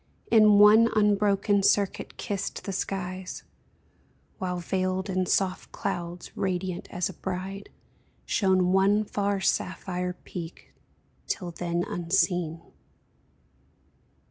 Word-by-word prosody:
In 215 -2 +7
one 215 +3 +7
unbroken 205 -1 +3
circuit 200 0 +1
kissed 200 -2 -4
the 195 - -4
skies; 185 -1 -4 1.0
While, 180 -1 -2
veiled 185 +2 -2
in 185 -1 0
soft 185 0 0
clouds, 175 -3 -5
radiant 185 -2 -2
as 180 -1 -1
a 190 - -7
bride, 190 +3 -5 0.6
Shone 185 -3 +2
one 195 +3 +4
far 200 -1 -1
sapphire 180 -1 -1
peak 170 -1 -8 0.5
till 180 -4 -3
then 170 0 -2
unseen 170 -1 0
190 Hz, 100 wpm, -27 LUFS, 180-200 Hz, 1.0 s, In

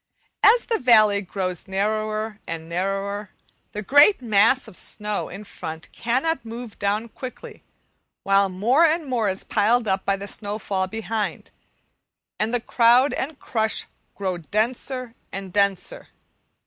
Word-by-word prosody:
As 470 +3 +6
the 460 - 0
valley 215 -5 +5
grows 185 -2 -4
narrower 215 +2 -1
and 165 -1 -5
narrower 195 +3 -2 0.4
the 210 - -4
great 290 - +6
mass 235 +2 +3
of - - -12
snow 210 +2 -3
in 195 +4 -8
front 160 -5 -8
cannot 265 +6 -1
move 230 0 -8
down 205 +3 0
quickly, 255 +2 -9 0.6
while 195 0 +3
more 230 - +3
and 325 0 +3
more 240 -6 0
is 190 0 -3
piled 225 +2 +2
up 190 -1 0
by 195 - +1
the 200 +1 -7
snowfall 205 -2 -2
behind, 220 +1 -4 0.9
and 215 +2 0
the 245 - +1
crowd 240 +4 +4
and 285 +2 -3
crush 220 -5 -1 0.3
grow 190 -3 -2
denser 240 - -2 0.2
and 195 -2 -7
denser. 200 -2 0
215 Hz, 135 wpm, -23 LUFS, 195-240 Hz, 0.9 s, As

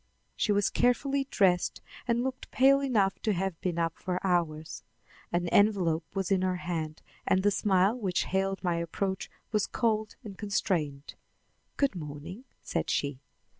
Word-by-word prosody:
She 215 - +1
was 205 -1 +2
carefully 275 +3 +1
dressed 180 -6 +2 0.3
and 235 0 +2
looked 260 0 -4
pale 275 +2 +5
enough 215 -8 +1
to 215 - +1
have 190 -2 -2
been 175 -2 -1
up 165 -1 -1
for 180 -1 -2
hours. 160 -7 0 0.5
An 175 0 0
envelope 180 -6 +3
was 195 0 -1
in 190 -1 +3
her 185 -1 +1
hand, 165 -3 -4 0.2
and 190 0 +3
the 205 - +4
smile 195 +1 +3
which 190 -5 0
hailed 195 +1 -1
my 175 -2 +1
approach 190 +3 -2 0.2
was 210 -3 +1
cold 220 -3 0
and 200 -4 -9
constrained. 160 -9 -1 0.6
"Good 280 -4 +2
morning," 160 - -7 0.2
said - - -2
she. 140 -2 -1
190 Hz, 155 wpm, -29 LUFS, 170-210 Hz, 0.6 s, pale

